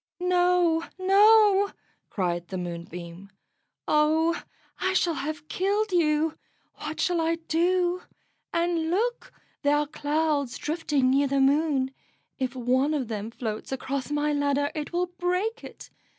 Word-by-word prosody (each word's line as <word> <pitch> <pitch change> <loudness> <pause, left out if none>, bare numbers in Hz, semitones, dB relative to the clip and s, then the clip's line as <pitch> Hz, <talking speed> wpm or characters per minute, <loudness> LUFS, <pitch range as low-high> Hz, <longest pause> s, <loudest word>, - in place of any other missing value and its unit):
"No, 355 -2 +2
no," 405 +1 +5 0.4
cried 175 -3 -2
the 190 - -5
Moonbeam. 175 +1 -7 0.6
"Oh, 315 +2 +2 0.4
I 375 0 0
shall 350 -2 +2
have 305 0 -5
killed 400 +5 0
you! 315 -2 +1 0.4
What 310 +1 -5
shall 355 -3 +1
I 325 +1 +1
do? 350 +2 0 0.5
And 335 -1 0
look, 465 +7 -1 0.3
there 285 +1 +3
are 295 - +1
clouds 295 -2 -1
drifting 295 -4 0
near 280 +1 +3
the 275 0 +1
Moon; 275 -1 +2 0.5
if 260 -1 -2
one 260 +4 +1
of 260 -6 -2
them 215 -1 -4
floats 225 -1 -5
across 265 0 -3
my 295 0 0
ladder 285 0 +1
it 300 -2 -5
will 355 +1 +1
break 365 +6 -1
it. - - -11
305 Hz, 135 wpm, -26 LUFS, 270-355 Hz, 0.6 s, no